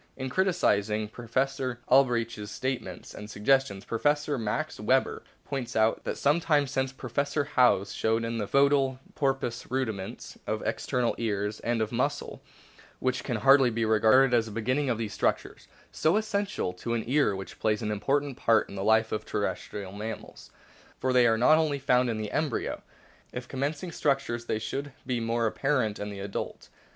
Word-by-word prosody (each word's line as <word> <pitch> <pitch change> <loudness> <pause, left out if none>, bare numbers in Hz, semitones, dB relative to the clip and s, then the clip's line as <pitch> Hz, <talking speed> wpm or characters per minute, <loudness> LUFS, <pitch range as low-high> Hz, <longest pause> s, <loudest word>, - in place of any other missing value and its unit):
In 130 -1 -4
criticisino 110 - +1
Professor 130 +1 -2
Albrecht's 115 -5 +2
statements 130 +4 -4
and 105 - -8
<_> - - -15
suggestions 105 -2 +1
Professor 145 +5 +1
Max 115 +9 -2
Weber 130 +5 +1
* - - -37
points 130 -4 -4
out 110 0 +2
that - - -2
some 145 +4 +3
time 150 -4 +2
since 135 -1 -1
Professor 140 +3 -1
Howes 120 -8 +3
showed 110 +1 +1
in 115 0 -2
the 105 - -2
fcetal 140 0 +3 0.2
porpoise 135 -4 -1
rudiments 110 -7 -4
of - - -2
external 125 -2 0
ears 105 -2 -1
and 115 -1 0
of 110 - -5
a - - -4
muscle, - - -2 0.6
which 130 0 -1
can 125 - -2
hardly 135 +2 +6
be 115 0 -1
regarded 110 +4 +5
as 115 -1 +2
a - - -7
beginning 130 +6 0
of 120 - +1
these 110 -2 -4
structures, - - -1 0.2
so 160 +6 +2
essential 205 - -1
to 115 +6 -3
an 115 - -1
ear 135 -5 +2
which 95 0 -8
plays 110 +1 0
an 105 - -1
important 140 +6 0
part 115 -1 +3
in - - -9
the 95 - -3
life 110 +1 +3
of 110 - -2
terrestrial 100 -2 -3
mammals. 105 +2 -7 0.5
For 130 0 0
they 125 -1 +6
are 115 - +4
only 155 +3 +4
found 125 -2 +2
in 115 - -1
the 105 -1 -4
embryo; 155 +3 -1 0.5
if 125 0 -6
com 130 - -7
mencing 150 +5 -2
structures 135 -6 0
they 110 - -1
should 140 +5 -4
be 125 -2 -1
more 115 0 0
apparent 120 -2 0
in 105 - -4
the 100 -1 -7
adult. 100 0 -5
120 Hz, 180 wpm, -28 LUFS, 110-135 Hz, 0.6 s, hardly